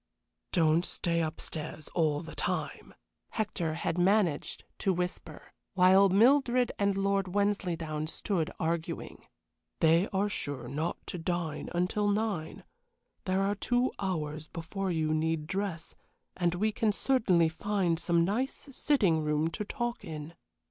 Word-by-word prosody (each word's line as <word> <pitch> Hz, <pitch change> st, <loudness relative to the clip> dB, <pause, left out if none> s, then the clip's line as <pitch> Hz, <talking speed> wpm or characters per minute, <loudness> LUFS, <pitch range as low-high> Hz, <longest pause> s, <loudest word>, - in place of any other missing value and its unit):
"Don't 165 Hz, -1 st, +3 dB
stay 170 Hz, -1 st, -1 dB
up 160 Hz, 0 st, -3 dB
stairs 155 Hz, -1 st, -4 dB
all 155 Hz, -3 st, +1 dB
the 165 Hz, -, -9 dB
time," -, -, -3 dB, 0.4 s
Hector 175 Hz, -7 st, -1 dB
had 165 Hz, +1 st, -2 dB
managed 185 Hz, -4 st, +2 dB, 0.2 s
to 195 Hz, -, +2 dB
whisper, 180 Hz, -3 st, -5 dB, 0.2 s
while 190 Hz, +1 st, +6 dB
Mildred 245 Hz, +4 st, +4 dB
and 200 Hz, -1 st, +2 dB
Lord 195 Hz, -1 st, 0 dB
Wensleydown 170 Hz, -7 st, 0 dB
stood 165 Hz, 0 st, -1 dB
arguing; 165 Hz, 0 st, -3 dB, 0.5 s
"they 165 Hz, +4 st, +4 dB
are 200 Hz, +1 st, 0 dB
sure 145 Hz, -, -4 dB
not 150 Hz, +6 st, -2 dB
to 180 Hz, -, -5 dB
dine 165 Hz, -2 st, -2 dB, 0.2 s
till 210 Hz, +2 st, 0 dB
nine; 205 Hz, -6 st, -1 dB, 0.6 s
there 190 Hz, +1 st, +1 dB
are 200 Hz, +1 st, +1 dB
two 245 Hz, +5 st, +1 dB
hours 155 Hz, -5 st, -3 dB
before 190 Hz, +3 st, -4 dB
you 160 Hz, -3 st, 0 dB
need 160 Hz, 0 st, 0 dB
dress, 185 Hz, -2 st, -3 dB, 0.4 s
and 175 Hz, -1 st, +1 dB
we 215 Hz, +4 st, +1 dB
can 215 Hz, 0 st, +1 dB
certainly 200 Hz, -8 st, +3 dB
find 175 Hz, 0 st, 0 dB
some 170 Hz, -1 st, +2 dB
nice 255 Hz, +8 st, -2 dB
sitting 205 Hz, -, +2 dB
room 150 Hz, +1 st, +1 dB
to 210 Hz, -, -3 dB
talk 240 Hz, +2 st, -3 dB
in." 155 Hz, -3 st, -7 dB
180 Hz, 135 wpm, -30 LUFS, 160-205 Hz, 0.6 s, while